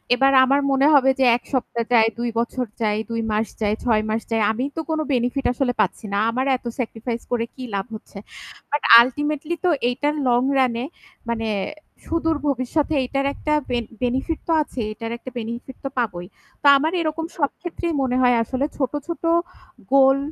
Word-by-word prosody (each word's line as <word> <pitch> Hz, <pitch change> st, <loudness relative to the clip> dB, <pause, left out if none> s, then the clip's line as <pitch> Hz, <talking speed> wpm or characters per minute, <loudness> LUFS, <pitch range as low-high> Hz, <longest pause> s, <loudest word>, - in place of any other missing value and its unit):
এবার 270 Hz, +2 st, +4 dB
আমার 275 Hz, +2 st, +3 dB
মনে 270 Hz, +2 st, +4 dB
হবে 270 Hz, -1 st, +5 dB
যে 265 Hz, -, +4 dB
১ -, -, -21 dB
সপ্তাহ 235 Hz, -2 st, -1 dB
যাই, 225 Hz, -1 st, +6 dB
২ 240 Hz, 0 st, -1 dB
বছর 245 Hz, +2 st, -2 dB, 0.2 s
যাই, 210 Hz, -1 st, +1 dB
২ 230 Hz, 0 st, -2 dB
মাস 215 Hz, +1 st, 0 dB
যাই, 210 Hz, 0 st, +1 dB
৬ 220 Hz, -3 st, +2 dB
মাস 220 Hz, +1 st, 0 dB
যাই 225 Hz, -, +1 dB
আমি 240 Hz, +4 st, -3 dB
তো 325 Hz, -, -2 dB
কোন 315 Hz, -1 st, 0 dB
বেনিফিট 250 Hz, +3 st, 0 dB
আসলে 250 Hz, -1 st, 0 dB
পাচ্ছি 205 Hz, +3 st, -2 dB
না। -, -, +1 dB
আমার 260 Hz, +3 st, -1 dB
এত 245 Hz, -, -32 dB
সেক্রিফাইস 230 Hz, 0 st, -3 dB
করে 230 Hz, -1 st, 0 dB
কি 260 Hz, -, -8 dB
লাভ 195 Hz, +1 st, -2 dB
হচ্ছে। 215 Hz, -, -12 dB, 0.5 s
বাট 290 Hz, -1 st, 0 dB, 0.2 s
আল্টিমেটলি 295 Hz, +5 st, -1 dB
তো -, -, +4 dB, 0.2 s
এটা 290 Hz, +4 st, -1 dB, 0.2 s
লং 240 Hz, 0 st, +3 dB, 0.2 s
রান 255 Hz, -3 st, +3 dB
এ -, -, -3 dB, 0.5 s
মানে 225 Hz, -1 st, -2 dB, 0.6 s
সুদূর 325 Hz, -1 st, 0 dB
ভবিষ্যতে 285 Hz, +3 st, 0 dB
এটার 275 Hz, +2 st, -1 dB
একটা 300 Hz, -, -2 dB, 0.2 s
বেন 240 Hz, -2 st, -1 dB, 0.2 s
বেনিফিট 265 Hz, +6 st, -1 dB
তো 335 Hz, -, 0 dB
আছেই। 245 Hz, -7 st, -4 dB
এটার 230 Hz, +1 st, -6 dB
একটা 255 Hz, -, -9 dB
বেনিফিট 235 Hz, +3 st, -6 dB
তো -, -, -1 dB
পাবোই। 180 Hz, -8 st, -2 dB, 0.3 s
তো 290 Hz, -, +3 dB
আমার 310 Hz, +3 st, 0 dB
এরকম 320 Hz, 0 st, -2 dB
সব 285 Hz, -3 st, +1 dB
ক্ষেত্রেই 345 Hz, -1 st, -3 dB
মনে 255 Hz, -1 st, 0 dB
হয় 245 Hz, -1 st, +4 dB
আসলে 260 Hz, +4 st, -2 dB
ছোট, 265 Hz, -3 st, -1 dB, 0.2 s
ছোট 340 Hz, 0 st, -5 dB, 0.7 s
গোল 270 Hz, 0 st, +6 dB
255 Hz, 185 wpm, -22 LUFS, 230-285 Hz, 0.7 s, যাই